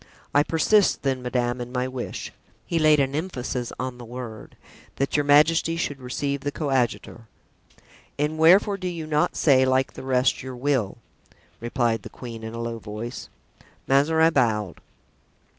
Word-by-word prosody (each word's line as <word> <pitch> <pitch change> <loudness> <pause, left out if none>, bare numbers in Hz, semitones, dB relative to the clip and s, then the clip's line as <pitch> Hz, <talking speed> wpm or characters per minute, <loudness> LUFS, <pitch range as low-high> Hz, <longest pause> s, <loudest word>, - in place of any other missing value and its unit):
I 145 - +5
persist, 175 +7 +2
then, 135 -2 0
madame, 125 0 -1
in 120 0 -6
my 125 0 -1
wish" 130 -1 -6 0.3
(he 165 - -1
laid 155 -1 +5
an 135 -1 +1
emphasis 135 -6 -3
on 130 -1 -4
the - - -8
word), 120 -2 -9 0.4
"that 135 - -1
your 145 - +3
majesty 160 +3 +4
should 145 -4 -3
receive 140 +2 -3
the 145 - -2
coadjutor." 130 -5 -2 0.9
"And 150 +2 -1
wherefore 190 +5 +5
do 185 -1 -4
you 170 -3 -4
not 150 -1 0
say, 135 -4 +4
like 130 0 +1
the - - -9
rest, 130 -1 +1
your 130 -1 -7
will?" 125 -6 -1 0.6
replied 120 -1 0
the - - -9
queen, 115 -3 -9
in 110 +1 -6
a - - -5
low 115 -1 -4
voice. 110 +4 -7 0.6
Mazarin 160 +4 +3
bowed. 105 -8 0
130 Hz, 160 wpm, -24 LUFS, 120-150 Hz, 0.9 s, I